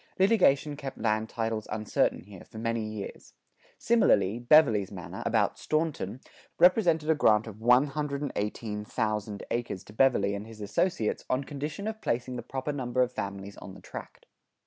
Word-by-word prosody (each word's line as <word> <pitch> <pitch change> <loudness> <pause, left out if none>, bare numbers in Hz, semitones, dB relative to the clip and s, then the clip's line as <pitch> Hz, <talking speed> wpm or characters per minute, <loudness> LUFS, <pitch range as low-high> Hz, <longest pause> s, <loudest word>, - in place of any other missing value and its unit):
Litigation 185 -8 +3
kept 140 -2 -7
land 110 0 0
titles 110 -2 -2
uncertain 105 0 0
here, 95 -2 -12
for - - -13
many 115 0 -1
years. 105 -2 -8 0.4
Similarly, 115 - +3
Beverley's 120 -7 +5
manor, 90 -4 -7
about - - +1
Staunton, 155 - -2 0.4
represented 175 -4 +4
a 160 - +5
grant 110 -8 +3
of 110 -1 -10
118,000 115 -6 0
acres 120 -6 -2
to 105 - -14
Beverley 110 -5 +3
and 100 +2 -5
his 115 -1 -12
associates 110 - 0
on 130 +2 +1
condition 150 +8 -5
of 220 0 -5
placing 125 +2 -2
the 120 - -4
proper 130 +4 -4
number 125 -3 0
of 125 - -2
families 100 -3 -6
on 95 - -10
the - - -12
tract. - - -10
120 Hz, 150 wpm, -28 LUFS, 105-145 Hz, 0.4 s, Beverley's